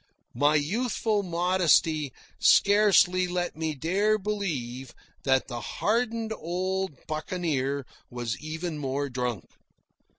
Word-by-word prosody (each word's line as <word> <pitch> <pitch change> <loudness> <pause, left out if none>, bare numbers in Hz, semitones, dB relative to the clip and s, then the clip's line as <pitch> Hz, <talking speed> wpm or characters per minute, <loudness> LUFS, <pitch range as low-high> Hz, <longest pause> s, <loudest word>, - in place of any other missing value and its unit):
My 145 +5 +3
youthful 215 - 0
modesty 170 -5 +2 0.3
scarcely 200 -3 +5
let 175 -2 -2
me 160 -1 -2
dare 195 +9 +1
believe 150 - -4 0.3
that 130 -1 +2
the 120 -2 -5
hardened 225 0 -1
old 185 -2 -3
buccaneer 155 -4 -2 0.2
was 120 -1 -3
even 160 +1 -5
more 140 0 -2
drunk. 125 -6 -3
165 Hz, 100 wpm, -27 LUFS, 140-190 Hz, 0.3 s, scarcely